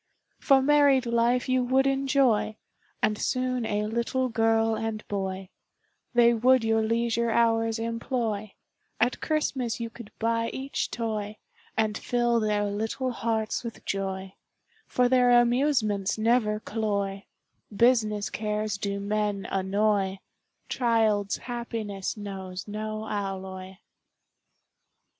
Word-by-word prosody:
For 270 -2 +4
married 285 -2 +4
life 235 +1 +2
you 255 -1 +2
would 260 +2 +2
enjoy, 270 -5 +2 0.5
And 210 -1 +2
soon 255 -2 -1
a 210 0 0
little 235 +4 -1
girl 225 0 +2
and 220 -1 -4
boy, 190 -2 -3 0.7
They 235 0 +6
would 250 +2 +4
your 225 0 +2
leisure 230 +1 0
hours 225 0 +2
employ, 230 -2 -3 0.4
At 245 +2 +1
Christmas 265 -7 -1
you 230 -1 -4
could 230 -2 -11
buy 230 0 0
each 270 +1 -3
toy, 215 -2 -3 0.4
And 215 -1 +1
fill 240 +1 +1
their 210 -1 +1
little 220 +5 -2
hearts 225 -2 -1
with 235 -1 -8
joy, 190 -1 -3 0.5
For 250 -1 +2
their 245 -1 +5
amusements 240 -6 +1
never 220 -1 +2
cloy, 200 -3 -2 0.5
Business 215 -2 +2
cares 210 -1 -2
do 200 0 -2
men 205 -1 -1
annoy, 195 0 +1 0.5
Child's 220 -5 +1
happiness 225 -5 -4
knows 190 -2 -6
no 215 +1 -4
alloy. 190 -2 -5
225 Hz, 115 wpm, -27 LUFS, 205-240 Hz, 0.7 s, They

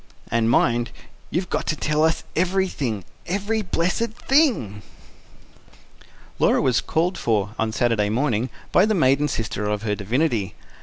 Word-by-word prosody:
"And 115 -1 +2
mind, 120 0 +2 0.4
you've 180 +2 -2
got - - -1
to 155 - +1
tell 150 0 0
us 160 0 +1
everything 175 - 0 0.2
every 205 +4 -1
blessed 185 +4 -1
thing!" 240 - +1 1.6
Laura - - +4
was 130 -2 +2
called 175 +4 -1
for, 105 -3 0
on 110 -1 0
Saturday 110 -2 +1
morning, 120 0 0 0.2
by 190 +4 +5
the 215 - +1
maiden 140 -2 +3
sister 110 -5 -3
of 105 0 -2
her 105 -2 0
divinity. 105 0 -1
130 Hz, 140 wpm, -23 LUFS, 110-180 Hz, 1.6 s, by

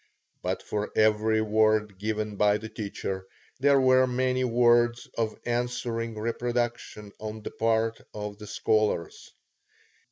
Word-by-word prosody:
But - - -2
for 105 0 -3
every 110 0 +3
word 110 -2 +2
given 105 0 -2
by 105 +1 +3
the 110 +1 -8
teacher, 100 -3 -5 0.3
there 140 +1 +5
were 130 0 +5
many 130 +1 0
words 120 0 +3
of 110 -2 -1
answering 120 -1 -2
reproduction 115 -2 -2
on 110 0 -6
the - - -5
part 115 0 0
of 105 -1 -6
the 105 - -9
scholars. 105 -8 0
110 Hz, 125 wpm, -27 LUFS, 105-120 Hz, 0.3 s, there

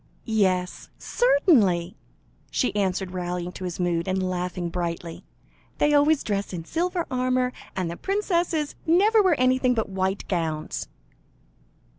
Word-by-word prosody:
"Yes, 190 -5 0
certainly," 220 - +2 0.5
she 250 - 0
answered, 190 -2 -1
rallying 180 -1 -3
to 185 - -7
his 180 -1 -5
mood, 175 -1 0
and 185 0 0
laughing 180 -1 -3
brightly; 170 -1 -4 0.5
"they 295 - +3
always 290 +1 +4
dress 200 -2 -2
in 165 -2 -5
silver 345 - -1
armour, 255 0 +1 0.2
and 185 -2 -1
the - - -5
princesses 345 -6 0
never 415 +7 +5
wear 365 -8 +2
anything 255 0 +3
but 220 -3 -1
white 190 0 -2
gowns." 155 - -2
195 Hz, 130 wpm, -25 LUFS, 180-290 Hz, 0.5 s, never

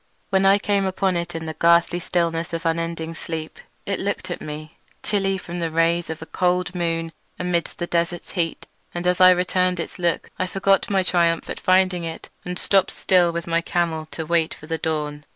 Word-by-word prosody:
When 195 0 +4
I 195 +1 +6
came 200 -1 +1
upon 190 0 0
it 170 0 -3
in 165 0 -4
the 160 - -4
ghastly 170 +1 +3
stillness 170 -1 -1
of 165 0 -3
unending 165 0 -1
sleep 160 -1 -6 0.3
it - - -1
looked - - -3
at - - -4
me, 155 +1 -8 0.2
chilly 195 -2 +1
from 175 -1 -6
the 165 -1 -1
rays 165 +1 +1
of 160 0 -5
a - - -9
cold 180 +1 0
moon 165 -2 -1 0.3
amidst 175 -2 -1
the 175 - -2
desert's 170 0 -1
heat. 170 -3 -2 0.3
And 175 0 -3
as 180 +1 +2
I 185 - +10
returned 180 0 +2
its 170 - -5
look 170 -1 0
I 185 - 0
forgot 195 +1 +2
my 195 -2 +2
triumph 170 -2 +1
at - - -5
finding 185 -1 +3
it, 165 -1 -6
and 180 0 -4
stopped 195 0 +3
still 180 -2 +3
with 170 0 -4
my 170 0 +1
camel 165 -2 -1
to 160 - -5
wait 165 0 +1
for - - -13
the 165 +1 -3
dawn. 150 -2 -2
170 Hz, 205 wpm, -23 LUFS, 165-180 Hz, 0.3 s, I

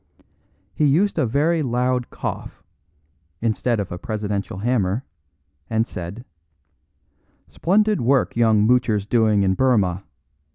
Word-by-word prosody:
He 150 - +1
used 170 +6 +2
a 135 - +2
very 155 +7 +1
loud 125 -1 0
cough, - - -6 0.8
instead 115 +1 0
of 100 - -4
a 90 - -5
presidential 105 -3 -4
hammer, 110 +1 0 0.6
and 110 0 +1
said: 90 +7 -8 1.2
"Splendid 210 +4 +1
work 130 +3 +1
young 110 -3 +3
Moocher's 115 -4 +2
doing 110 -2 +2
in 95 -1 +2
Burmah. 100 -7 +1
115 Hz, 115 wpm, -22 LUFS, 105-130 Hz, 1.2 s, young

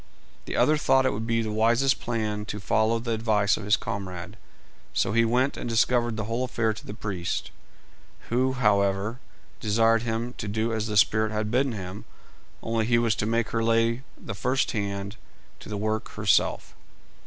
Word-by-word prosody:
The - - -4
other 155 +1 +4
thought 135 -3 +3
it 130 - +2
would 110 +2 -4
be 115 0 +1
the 110 - -3
wisest 115 +5 +2
plan 110 -3 -2
to 105 0 -5
follow 110 +3 +2
the 115 +1 -4
advice 110 -2 +2
of 105 - -7
his 105 0 +4
comrade, 95 -3 -6 0.6
so - - +1
he 115 0 +4
went 125 +4 +1
and - - -4
discovered 120 0 +2
the 110 - -2
whole 115 +4 -2
affair 115 -3 0
to - - -11
the 105 - -6
priest, 95 -6 -3 0.8
who, 130 +2 +1
however, 105 -1 +1 0.4
desired 115 +1 +3
him 115 +1 -3
to - - -4
do 110 +2 -1
as 110 0 -1
the 105 -1 -1
spirit 110 +2 +3
had 105 0 -2
bidden 130 +1 +2
him, 95 -1 -7 0.6
only 115 -1 0
he 120 -1 +4
was 115 -2 +2
to 105 - -1
make 115 0 0
her 115 0 -1
lay 115 +1 +2 0.2
the - - -6
first 130 +6 0
hand 100 -1 -3 0.4
to - - -11
the 105 - -3
work 110 +1 -2
herself. 105 -2 +1
110 Hz, 185 wpm, -26 LUFS, 105-115 Hz, 0.8 s, other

